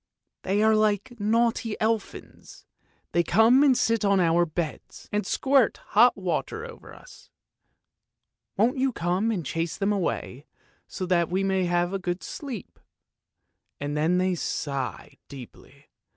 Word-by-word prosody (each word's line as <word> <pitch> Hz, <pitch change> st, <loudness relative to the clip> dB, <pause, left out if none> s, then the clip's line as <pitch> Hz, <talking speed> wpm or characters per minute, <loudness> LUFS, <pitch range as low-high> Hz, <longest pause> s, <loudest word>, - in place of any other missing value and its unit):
They 200 Hz, +3 st, 0 dB
are 220 Hz, 0 st, +5 dB
like 215 Hz, +2 st, +1 dB
naughty 225 Hz, +1 st, 0 dB
elfins; 220 Hz, -1 st, -4 dB, 0.5 s
they 170 Hz, -, +3 dB
come 225 Hz, +9 st, +4 dB
and 275 Hz, -4 st, +4 dB
sit 225 Hz, -1 st, +1 dB
on 200 Hz, -1 st, +3 dB
our 170 Hz, 0 st, +3 dB
beds 155 Hz, -1 st, -6 dB
and 210 Hz, -1 st, -1 dB
squirt 270 Hz, -4 st, +2 dB, 0.2 s
hot 240 Hz, +4 st, +6 dB
water 195 Hz, -, -3 dB
over 480 Hz, 0 st, -12 dB
us. -, -, -16 dB, 1.3 s
Won't 245 Hz, +6 st, +2 dB
you 265 Hz, 0 st, +2 dB
come 180 Hz, +2 st, -1 dB
and 190 Hz, -8 st, -2 dB
chase 165 Hz, +3 st, -3 dB
them 200 Hz, +1 st, 0 dB
away 160 Hz, -7 st, -3 dB, 0.4 s
so 185 Hz, -, -5 dB
that 175 Hz, -2 st, +1 dB
we 190 Hz, +2 st, 0 dB
may 190 Hz, -1 st, +1 dB
have 175 Hz, +1 st, 0 dB
a 195 Hz, -, -1 dB
good 175 Hz, 0 st, -4 dB
sleep? 260 Hz, -9 st, -8 dB, 0.5 s
' -, -, -54 dB
and 145 Hz, +1 st, -3 dB
then 160 Hz, +4 st, +2 dB
they 185 Hz, 0 st, +1 dB
sigh 135 Hz, -, -4 dB
deeply. 130 Hz, -4 st, -13 dB
195 Hz, 145 wpm, -26 LUFS, 175-225 Hz, 1.3 s, hot